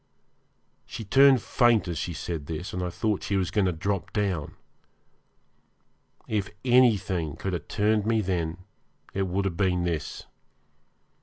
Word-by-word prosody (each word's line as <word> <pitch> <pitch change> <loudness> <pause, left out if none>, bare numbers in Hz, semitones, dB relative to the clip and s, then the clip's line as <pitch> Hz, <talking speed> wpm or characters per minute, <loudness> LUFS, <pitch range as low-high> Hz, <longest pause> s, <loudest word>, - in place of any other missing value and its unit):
She 115 -3 -7
turned 135 +3 +5
faint 120 -5 +3
as 85 -3 -3
she 85 - -3
said 80 -2 -5
this, 80 +4 -5
and 90 - -3
I 90 - -2
thought 105 +3 -1
she 100 - -2
was 95 -2 0
going 105 -3 +2
to - - +2
drop 95 +2 -3
down. 95 -8 -1 1.7
If 105 -3 -1 0.2
anything 105 - +3
could 95 - -4
have 85 - -4
turned 105 0 +1
me 110 -1 +2
then 85 -4 -2 0.6
it 95 -1 -1
would 95 +2 -1
have 90 -4 -2
been 90 -3 +1
this. 85 -4 -3
95 Hz, 150 wpm, -26 LUFS, 85-105 Hz, 1.7 s, turned